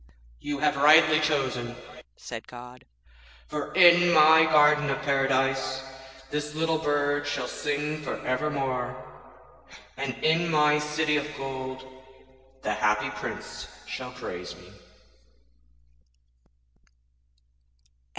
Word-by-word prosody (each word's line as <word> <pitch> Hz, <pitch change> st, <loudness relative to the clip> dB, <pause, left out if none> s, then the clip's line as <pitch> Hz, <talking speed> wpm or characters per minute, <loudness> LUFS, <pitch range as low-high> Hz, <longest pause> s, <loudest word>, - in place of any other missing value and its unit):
'You 145 Hz, -1 st, -4 dB
have 150 Hz, 0 st, 0 dB
rightly 155 Hz, +2 st, +6 dB
chosen,' 130 Hz, -6 st, -1 dB, 0.4 s
said -, -, -9 dB
God,'for 90 Hz, -, -11 dB
in 175 Hz, -1 st, +6 dB
my 160 Hz, 0 st, +6 dB
garden 150 Hz, -1 st, +4 dB
of 135 Hz, 0 st, -1 dB
Paradise 135 Hz, -1 st, 0 dB, 0.5 s
this 150 Hz, 0 st, -4 dB
little 160 Hz, 0 st, 0 dB
bird 145 Hz, -1 st, 0 dB
shall 145 Hz, 0 st, -3 dB
sing 150 Hz, +1 st, -3 dB
for 145 Hz, -, -4 dB
evermore, 130 Hz, -2 st, -2 dB, 1.0 s
and 135 Hz, -1 st, -4 dB
in 165 Hz, +2 st, +2 dB
my 150 Hz, -1 st, +3 dB
city 150 Hz, 0 st, 0 dB
of 145 Hz, 0 st, -2 dB
gold 130 Hz, -1 st, -6 dB, 0.8 s
the 105 Hz, -, -1 dB
Happy 105 Hz, 0 st, 0 dB
Prince -, -, -7 dB, 0.2 s
shall -, -, -7 dB
praise -, -, -7 dB
me.' -, -, -17 dB
145 Hz, 100 wpm, -26 LUFS, 130-150 Hz, 1.0 s, rightly